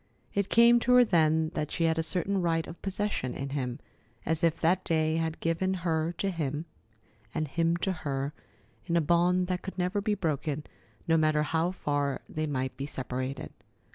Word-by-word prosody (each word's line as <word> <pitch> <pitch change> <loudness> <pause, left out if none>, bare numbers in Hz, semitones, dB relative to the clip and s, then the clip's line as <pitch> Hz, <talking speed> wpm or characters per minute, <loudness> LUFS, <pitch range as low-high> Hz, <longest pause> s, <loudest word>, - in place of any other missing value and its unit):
It 200 -1 0
came 235 +1 +6
to 250 +1 +2
her 250 0 +8
then 160 -4 +3
that 150 - -2
she 170 - -1
had 165 0 +2
a - - +3
certain 185 +4 0
right 165 -2 +1
of 165 - -10
possession 195 -9 -2
in 140 0 -4
him, 130 -3 -2 0.5
as 160 +2 0
if 165 -1 +2
that 180 +3 +2
day 160 -1 +1
had 160 -1 -2
given 175 +3 0
her 160 0 +1
to 195 +3 -1
him 155 -2 -3 0.7
and 155 - 0
him 165 +3 +1
to 190 - +1
her 140 -4 -3 0.5
in 170 -1 +2
a - - +5
bond 175 +3 +3
that 180 0 -2
could 190 - -7
never 185 +3 0
be 210 0 +1
broken, 155 -4 -2 0.4
no 165 0 +4
matter 155 -1 +3
how 160 +3 +1
far 145 -6 -1
they 155 0 -3
might 130 -3 -2
be 140 +2 -4
separated. 130 0 -4
165 Hz, 190 wpm, -29 LUFS, 150-180 Hz, 0.7 s, her